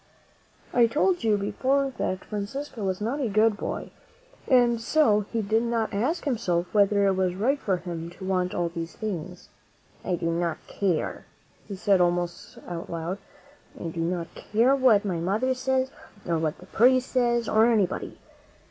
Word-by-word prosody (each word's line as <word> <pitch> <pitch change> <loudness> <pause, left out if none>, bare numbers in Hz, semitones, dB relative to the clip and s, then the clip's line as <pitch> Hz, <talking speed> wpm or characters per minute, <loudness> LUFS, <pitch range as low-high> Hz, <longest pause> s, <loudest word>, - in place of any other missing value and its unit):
I 240 -1 +5
told 310 +6 +1
you 215 -2 +3
before 265 +7 0
that 185 0 -2
Francisco 215 +4 -5
was 190 0 -2
not 240 +7 -1
a 245 - 0
good 215 +1 +3
boy, - - -5 0.6
and 240 -3 +4
so 220 -6 +3
he 230 -2 -1
did 220 +3 +2
not 230 -2 -1
ask 270 - -1
himself 185 -10 0
whether 200 -1 +4
it 195 - +3
was 185 -1 0
right 260 +9 +1
for 190 -7 0
him 170 -2 -6
to 190 - -8
want 180 -1 0
all 175 -1 0
these 165 -1 -6
things. 180 -4 -5 0.5
"I 180 - 0
do 165 -1 -1
not 170 -1 -1
care," 185 -6 -2 0.4
he 200 - -5
said 190 0 +3
almost 175 0 -1
out 170 -1 -6
loud; 170 +4 -4 0.6
"I 165 - -4
do 165 +1 -4
not 170 0 -2
care 235 +5 +2
what 245 -7 +4
my 185 -4 -1
mother 210 +10 +1
says, 260 0 0 0.4
or 165 -2 +1
what 160 0 -1
the 180 - -14
priest 255 +6 +3
says, 240 -2 +1
or 220 +1 +4
anybody. 210 -6 0
205 Hz, 170 wpm, -26 LUFS, 180-240 Hz, 0.6 s, I